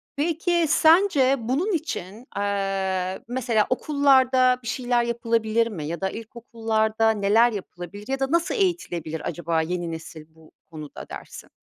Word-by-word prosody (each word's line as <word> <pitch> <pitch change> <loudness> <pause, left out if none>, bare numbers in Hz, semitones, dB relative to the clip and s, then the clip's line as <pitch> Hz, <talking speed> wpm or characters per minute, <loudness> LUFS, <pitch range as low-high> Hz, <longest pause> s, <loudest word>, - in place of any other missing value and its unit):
Peki, 335 +3 +1
sence 315 -6 +4
bunun 265 - -1
için, 235 - -5
aaa, 195 -2 -1
mesela 235 -3 +1
okullarda 260 -2 +3
bir 235 - -8
şeyler 245 0 0
yapılabilir 230 -1 0
mi 170 -9 -6
ya 170 +3 -5
da 190 - 0
ilkokullarda 225 -1 -1
neler 220 +3 +3
yapılabilir 200 0 -8
ya 270 0 -2
da 270 +1 -1
nasıl 340 +5 +1
eğitilebilir 175 - -1
acaba 165 -2 -1
yeni 175 +1 -3
nesil 160 -1 -8
bu 160 -1 -19
konuda 155 -3 -10
dersin? - - -10
225 Hz, 135 wpm, -24 LUFS, 190-265 Hz, -, sence